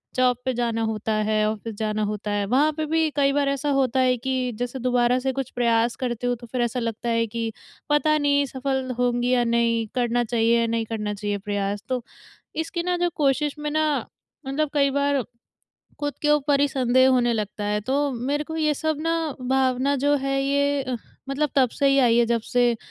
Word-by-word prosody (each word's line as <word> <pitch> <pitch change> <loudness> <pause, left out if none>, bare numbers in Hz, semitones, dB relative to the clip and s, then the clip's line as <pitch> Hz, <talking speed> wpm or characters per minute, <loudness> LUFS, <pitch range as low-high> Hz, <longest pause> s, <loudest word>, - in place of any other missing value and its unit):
Job 250 -1 +3
पे 260 - 0
जाना 230 -1 -1
होता 220 0 -2
है 215 0 +2
ऑफ़िस 220 +1 -5
जाना 215 -1 -1
होता 210 0 -3
है 205 -1 0
वहाँ 280 +8 +3
पे 310 - -1
भी 320 0 +1
कई 275 -1 +3
बार 285 -1 +1
ऐसा 280 +1 -1
होता 260 -1 +1
है 255 -1 +3
कि 260 +2 -2 0.2
जैसे 245 +2 -3
दोबारा 245 0 +2
से 265 +1 -1
कुछ 270 -1 -3
प्रयास 235 -1 +1
करते 245 -1 -3
हो 245 - +1
तो 240 0 -12
फ़िर 250 +1 -2
ऐसा 240 +1 -1
लगता 230 0 -3
है 230 0 +2
कि 225 +1 -3 0.4
पता 305 +1 +3
नहीं 285 -1 +2
सफल 265 0 -2
होंगी 245 0 +1
या 245 -1 +3
नहीं 230 -1 +1
करना 240 -1 +1
चाहिए 235 0 +2
या 230 - +1
नहीं 230 0 -1
करना 210 -2 -3
चाहिए 205 0 -3
प्रयास। 205 0 -3
तो 255 -2 -1 0.5
इसकी 325 +2 -2
ना 360 0 0
जो 350 0 +1
क़ोशिश 290 +1 +1
में 300 0 -2
ना 310 +1 +2 0.6
मतलब 290 +2 0
कई 280 -2 +3
बार 280 0 +1 0.8
ख़ुद 290 0 -2
के 295 - +1
ऊपर 290 -1 +3
ही 285 - +4
संदेह 260 -1 +3
होने 245 -2 +3
लगता 210 -2 -3
है 210 0 0
तो 280 +5 0
मेरे 275 +5 -2
को 320 +1 -6
ये 305 -1 +2
सब 315 +2 -1
ना 330 +1 0 0.4
भावना 265 +1 +2
जो 285 +2 +2
है 275 0 -1
ये 280 0 +1
अ, 255 -1 -3 0.3
मतलब 285 +1 0
तब 260 -2 +5
से 280 - 0
ही 275 - +4
आई 240 -3 +4
है 240 - +5
जब 235 0 +1
से 245 0 +2
255 Hz, 210 wpm, -24 LUFS, 230-280 Hz, 0.8 s, तब